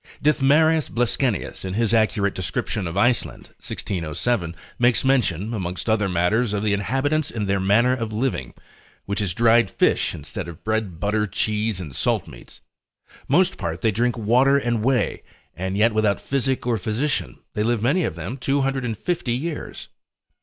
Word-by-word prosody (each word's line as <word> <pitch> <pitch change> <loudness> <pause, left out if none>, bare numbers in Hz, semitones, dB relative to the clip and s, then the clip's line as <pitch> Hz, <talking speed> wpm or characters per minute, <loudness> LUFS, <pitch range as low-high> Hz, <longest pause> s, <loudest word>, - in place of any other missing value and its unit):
Dithmarus 150 +2 +3
Bleskenius 120 -1 -1
in 95 0 -4
his 115 0 +1
accurate 110 -3 +2
description 95 +1 -3
of 85 +3 -5
Iceland, 120 +3 +1
1607, 85 +1 -2 0.2
makes 120 +1 +3
mention, 115 - +1
amongst 90 -2 -4
other 110 -3 +2
matters, 100 +6 +1
of 105 0 -1
the 105 -1 +2
inhabitants, 135 +9 0
and 110 -3 -3
their 100 0 +1
manner 110 +7 +3
of 115 -3 -4
living, 110 - -2 0.5
which 100 +1 -2
is 95 -4 -1
dried 115 -2 +4
fish - - +1
instead 75 +3 -6
of 85 -2 -10
bread, 110 -6 -2
butter, 105 +2 0
cheese, 105 0 -1
and 75 -7 -7
salt - - 0
meats, - - -13 0.7
most 180 +7 +2
part 80 0 -3
they 110 - +2
drink 120 +3 0
water 125 +5 +4
and 120 -5 -1
whey, 130 0 +1 0.3
and 95 +2 -3
yet 110 +2 +4
without 110 -2 +2
physic 135 -2 -1
or 120 -3 +1
physician, 110 - -2 0.2
they 105 - -1
live 115 0 0
many 155 +9 +2
of 80 - -2
them 90 +10 -5
250 135 - -1
years. 150 +6 -4
110 Hz, 160 wpm, -23 LUFS, 100-125 Hz, 0.7 s, dried